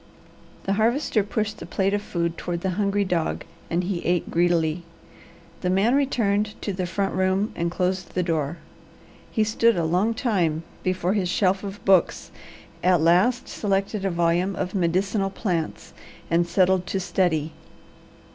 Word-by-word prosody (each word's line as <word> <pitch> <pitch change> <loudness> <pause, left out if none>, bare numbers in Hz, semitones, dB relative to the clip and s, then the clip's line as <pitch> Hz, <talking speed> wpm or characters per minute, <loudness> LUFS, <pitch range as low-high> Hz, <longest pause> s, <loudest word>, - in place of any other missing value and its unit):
The 195 - 0
Harvester 225 +2 +2
pushed 210 +1 -3
the - - -7
plate 195 0 0
of 205 - 0
food 170 -4 -2
toward 170 0 -4
the 190 0 -1
hungry 200 +1 0
dog 175 -3 -1 0.3
and 170 +2 0
he 180 -1 -3
ate 175 0 0
greedily. 170 -1 +2 0.8
The 180 - 0
man 195 +6 +3
returned 215 -7 +1
to 200 - -2
the 185 -1 -2
front 195 +2 -1
room 190 +3 +1
and 170 0 -1
closed 180 +1 -2
the 180 - +1
door. 160 -2 -1 0.7
He 220 - +1
stood 220 0 +2
a 170 - +1
long 185 +8 +1
time 180 - 0 0.2
before 185 0 0
his 190 -4 0
shelf 190 +1 +1
of 200 0 -7
books, 190 -3 +3 0.5
at 180 -1 +4
last 180 +10 +3
selected 195 0 -1
a 195 - +1
volume 175 +2 +1
of 180 - -3
"Medicinal 195 +2 +1
Plants" 180 -5 -3 0.4
and 170 +1 +3
settled 185 0 +2
to 195 - -1
study. 165 -4 0
185 Hz, 155 wpm, -24 LUFS, 175-205 Hz, 0.8 s, at